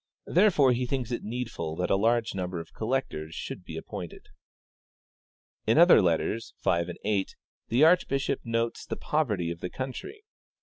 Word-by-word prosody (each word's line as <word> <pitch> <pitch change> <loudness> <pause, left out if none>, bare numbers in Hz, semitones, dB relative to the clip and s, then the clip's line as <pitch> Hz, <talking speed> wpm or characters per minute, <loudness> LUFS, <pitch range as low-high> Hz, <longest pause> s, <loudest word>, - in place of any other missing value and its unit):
Therefore 170 -8 +4
he 125 +1 0
thinks 125 -2 -2
it 120 - -2
needful 110 -9 -4
that 90 +2 -1
a - - +5
larger 115 +2 +1
number 90 -2 -3
of 85 - -10
collectors 110 -10 -3
should - - -6
be - - -8
appointed. - - -8 0.7
" - - -54
In 110 - +4
other 170 +2 +8
letters 90 +6 0
(letters 85 -1 +2
5, 85 - -5
8) 100 -2 0 0.3
the 120 +6 +3
archbishop 140 -5 +3
notes 115 0 -1
the - - -4
poverty 105 - 0
of 85 - -6
the 90 - -4
country. 135 - -6
115 Hz, 165 wpm, -28 LUFS, 90-135 Hz, 0.7 s, other